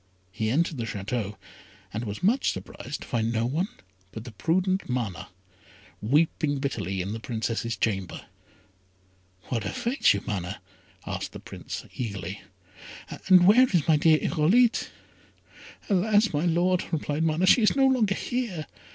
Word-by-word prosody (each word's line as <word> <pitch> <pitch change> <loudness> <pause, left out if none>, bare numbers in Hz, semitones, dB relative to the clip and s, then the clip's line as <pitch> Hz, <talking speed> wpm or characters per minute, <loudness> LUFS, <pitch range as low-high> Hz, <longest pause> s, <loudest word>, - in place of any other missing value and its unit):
He 110 +1 -2
entered 160 +5 +1
the 115 - -3
Château, 105 0 -3 0.6
and 110 +3 -3
was 105 - -6
much 235 +8 +3
surprised - - -7
to - - -9
find 115 -1 0
no 115 0 0
one 155 +10 0 0.4
but 110 - -7
the 120 - -9
prudent 185 - 0
Mana, 115 -8 -3 0.7
weeping 145 +4 +1
bitterly 95 - -2
in 100 +3 -4
the 115 - -5
Princess's 115 0 -3
chamber. 95 -5 -2 1.2
"What 115 -4 -1
afflicts 240 - +1
you, 100 - -4
Mana?" 100 -1 -4 0.5
asked - - -4
the - - -8
Prince, - - -8
eagerly; 100 -5 -5 0.9
"and 180 -2 +8
where 240 +7 +7
is 175 -6 +1
my 160 -2 +5
dear 155 +1 +5
Irolite?" 195 +12 +2 1.0
"Alas! 205 +2 +3
my 150 +4 +1
Lord," 180 +2 +2
replied 155 -1 -1
Mana, 165 +3 +2
"she 230 - +6
is 215 - +3
no 270 -1 +4
longer 235 -7 +3
here. 225 -12 -3
150 Hz, 145 wpm, -26 LUFS, 110-185 Hz, 1.2 s, and